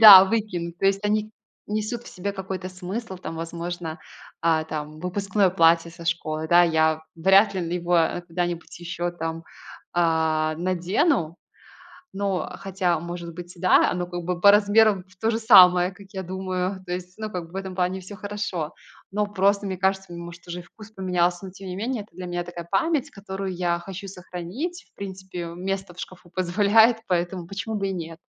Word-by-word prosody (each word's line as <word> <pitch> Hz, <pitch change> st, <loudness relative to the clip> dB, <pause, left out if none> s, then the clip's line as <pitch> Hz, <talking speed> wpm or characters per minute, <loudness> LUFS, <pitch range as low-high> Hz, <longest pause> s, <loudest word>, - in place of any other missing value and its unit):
Да, 195 Hz, -4 st, +12 dB
выкину. 190 Hz, -5 st, -1 dB
То 195 Hz, -, +2 dB
есть 195 Hz, 0 st, +3 dB
они 215 Hz, +1 st, +1 dB, 0.4 s
несут 215 Hz, +3 st, -2 dB
в -, -, -10 dB
себе 200 Hz, +3 st, -4 dB
какой-то 190 Hz, -1 st, -5 dB
смысл 190 Hz, +3 st, -5 dB
там, 175 Hz, -2 st, -7 dB
возможно, 170 Hz, 0 st, -5 dB, 0.4 s
а, 160 Hz, -1 st, +3 dB
там 155 Hz, -1 st, -6 dB
выпускное 195 Hz, +2 st, +1 dB
платье 170 Hz, -1 st, +4 dB
со 170 Hz, 0 st, -11 dB
школы. 160 Hz, -2 st, -1 dB
Да, 175 Hz, +1 st, +7 dB
я 160 Hz, -1 st, +2 dB
вряд 195 Hz, +5 st, +5 dB
ли 175 Hz, -2 st, -2 dB
его 175 Hz, 0 st, +2 dB, 0.3 s
куда-нибудь 175 Hz, 0 st, -3 dB
еще 175 Hz, 0 st, -3 dB
там, 165 Hz, -1 st, -5 dB, 0.5 s
а, 160 Hz, -2 st, +2 dB
надену. 180 Hz, -, +1 dB, 0.8 s
Но 195 Hz, -1 st, -1 dB
хотя 185 Hz, -4 st, 0 dB
может 170 Hz, 0 st, -6 dB
быть 175 Hz, 0 st, -8 dB
да, 185 Hz, +1 st, +4 dB
оно 180 Hz, -1 st, -2 dB
как 175 Hz, 0 st, -5 dB
бы 175 Hz, 0 st, -2 dB
по 200 Hz, -, +8 dB
размерам 205 Hz, -1 st, +4 dB, 0.2 s
тоже 225 Hz, 0 st, +2 dB
самое, 185 Hz, -5 st, +7 dB
как 195 Hz, +1 st, -15 dB
я 190 Hz, -1 st, -4 dB
думаю. 185 Hz, +1 st, -3 dB
То 180 Hz, -, -3 dB
есть, 180 Hz, 0 st, -6 dB
ну, 215 Hz, 0 st, -3 dB
как 180 Hz, -4 st, -4 dB
бы, -, -, -20 dB
в -, -, -12 dB
этом 190 Hz, -1 st, -5 dB
плане 185 Hz, +1 st, 0 dB
всё 195 Hz, +3 st, -9 dB
хорошо. 200 Hz, -6 st, -4 dB, 0.4 s
Но 210 Hz, +1 st, 0 dB
просто, 200 Hz, 0 st, +2 dB
мне 190 Hz, -1 st, -3 dB
кажется, 190 Hz, 0 st, 0 dB
может 170 Hz, 0 st, -9 dB
уже 175 Hz, +1 st, -5 dB
и -, -, -15 dB
вкус 215 Hz, +4 st, -14 dB
поменялся, 180 Hz, -2 st, 0 dB
но 190 Hz, -, -8 dB
тем 195 Hz, +1 st, -10 dB
не 180 Hz, -, -4 dB
менее, 225 Hz, +2 st, -2 dB
это 205 Hz, -, -24 dB
для 185 Hz, -, -6 dB
меня 175 Hz, 0 st, -2 dB
такая 175 Hz, -1 st, -8 dB
память, 295 Hz, +5 st, +1 dB
которую 195 Hz, -3 st, -5 dB
я 175 Hz, -1 st, +1 dB
хочу 195 Hz, +2 st, -8 dB
сохранить. 190 Hz, -, -6 dB
В -, -, -52 dB
принципе, 190 Hz, -2 st, -6 dB
место 190 Hz, +2 st, -4 dB
в 180 Hz, -, -15 dB
шкафу 180 Hz, -2 st, -9 dB
позволяет, 205 Hz, +6 st, +4 dB
поэтому 175 Hz, 0 st, -1 dB
почему 200 Hz, +4 st, -4 dB
бы 195 Hz, -1 st, -1 dB
и 190 Hz, -, -2 dB
нет? 165 Hz, -2 st, -6 dB
185 Hz, 180 wpm, -25 LUFS, 175-195 Hz, 0.8 s, Да